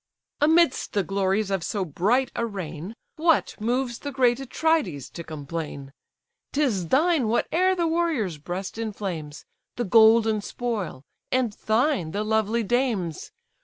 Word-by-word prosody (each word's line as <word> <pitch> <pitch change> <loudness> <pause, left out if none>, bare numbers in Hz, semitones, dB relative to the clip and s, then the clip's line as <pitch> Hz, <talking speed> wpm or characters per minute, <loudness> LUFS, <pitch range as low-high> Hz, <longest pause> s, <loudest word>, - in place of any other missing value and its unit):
"Amidst 320 0 +3
the 200 - +1
glories 195 +1 0
of 195 -2 0
so 200 +1 -2
bright 210 - +1
a - - -1
reign, 190 -2 -5 0.2
What 325 0 +2
moves 240 +1 -1
the 285 - -5
great 250 -2 +2
Atrides 255 - 0
to 170 - -7
complain? 150 -2 -6 0.6
'Tis 240 - +1
thine 310 - +3
whate'er 360 +11 +2
the 345 -2 0
warrior's 320 - 0
breast 185 +7 -5
inflames, 190 -9 -5 0.3
The 240 - -2
golden 220 +1 +5
spoil, 205 - -4 0.3
and 255 -4 +1
thine 220 - +1
the 205 +1 -1
lovely 220 +1 +1
dames. 215 - -1
220 Hz, 130 wpm, -25 LUFS, 185-260 Hz, 0.6 s, golden